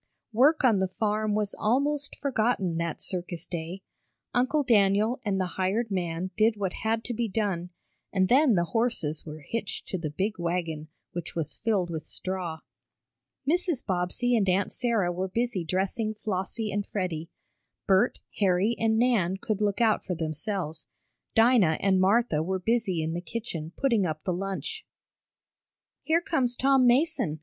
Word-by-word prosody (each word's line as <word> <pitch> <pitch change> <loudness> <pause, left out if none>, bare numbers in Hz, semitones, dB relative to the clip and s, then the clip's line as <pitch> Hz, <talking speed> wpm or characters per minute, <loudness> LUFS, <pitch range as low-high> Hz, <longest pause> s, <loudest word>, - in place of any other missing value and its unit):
Work 285 +7 +4
on 225 -6 +5
the 190 - +1
farm 215 +2 0
was 210 -1 0
almost 280 +6 +1
forgotten 220 -9 0
that 170 -2 -3
circus 175 -2 -3
day. 175 +3 -5 0.5
Uncle 260 +5 +2
Daniel 215 +1 +3
and 200 -4 0
the 185 - +1 0.2
hired 210 +4 0
man 180 -1 -2
did 220 0 +3
what 195 -3 -2
had 225 +1 0
to 245 - -3
be 235 0 -1
done, 190 -4 -1 0.4
and 190 -2 +2
then 260 0 +5
the 170 - +3
horses 225 -11 0
were 155 0 -7
hitched 230 -3 -3
to 185 - -2
the 160 -2 -3
big 190 +7 -2
wagon, 170 -3 -2 0.2
which 175 -1 -6
was 165 -4 -2
filled 200 -6 0
with 160 -2 -5
straw. 180 -4 -4 0.9
Mrs. 345 -3 +1
Bobbsey 190 +7 0
and 200 -4 +2
Aunt 190 +2 +1
Sarah 225 -8 +1
were 185 +2 -2
busy 230 -1 -1
dressing 195 +6 -1
Flossie 210 +2 -2
and 205 +1 -1
Freddie. 175 -5 -3 0.6
Bert, 195 +5 +3 0.2
Harry 195 +3 +3
and 220 -1 +2
Nan 220 -7 +2
could 210 +1 -2
look 205 +1 +1
out 220 -2 +3
for 180 - -3
themselves. 160 +1 -3 0.5
Dinah 225 -8 +5
and 190 -1 +3
Martha 195 -4 +3
were 190 +4 -1
busy 195 -4 0
in 160 +1 -2
the 175 - -3
kitchen 170 -4 -5
putting 230 -9 +2
up 155 -1 -4
the 185 - -1
lunch. 195 - -4 1.2
"Here 325 +2 +2
comes 255 -8 0
Tom 270 -1 +4
Mason!" 250 - +2
200 Hz, 160 wpm, -27 LUFS, 180-235 Hz, 1.2 s, on